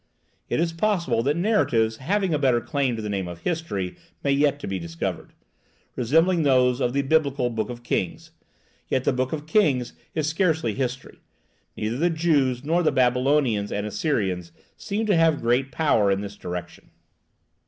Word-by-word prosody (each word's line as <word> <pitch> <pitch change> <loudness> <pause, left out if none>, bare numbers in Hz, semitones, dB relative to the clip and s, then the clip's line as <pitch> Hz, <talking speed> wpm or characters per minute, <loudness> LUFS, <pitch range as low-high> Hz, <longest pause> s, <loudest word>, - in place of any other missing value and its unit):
It - - 0
is 165 0 0
possible 175 - +1
that 145 +6 0
narratives 120 - +2
having 190 - 0
a 150 - +1
better 130 -4 +3
claim 135 0 -1
to 110 - -5
the - - -3
name 95 -3 -2
of 85 -1 -8
history 160 - -3 0.3
may 140 - +2
yet 145 0 +1
be 95 -1 -2
discovered, 85 -1 -5 0.6
resembling 165 +8 +3
those 130 -3 +3
of 120 -1 +1
the 140 0 +1
Biblical 140 -4 +1
Book 110 0 -2
of 120 -1 -8
Kings; - - -3 0.6
yet 130 - 0
the - - +2
Book 130 0 -1
of 150 -1 -4
Kings 150 - +2 0.2
is 155 -2 0
scarcely 160 - +1
history 130 0 -4 0.6
neither 110 +3 -2
the 170 +5 +2
Jews 145 -7 +1
nor 165 +4 +1
the 160 - +2
Babylonians 125 -4 +2
and 105 0 -2
Assyrians 95 - -1 0.2
seem 215 +3 -3
to 205 -3 +3
have 165 -1 +4
had - - -9
great 125 +3 +1
power 125 -8 +2
in 100 0 +1
this 100 0 -7
direction. 90 -3 -7
130 Hz, 175 wpm, -24 LUFS, 115-160 Hz, 0.6 s, have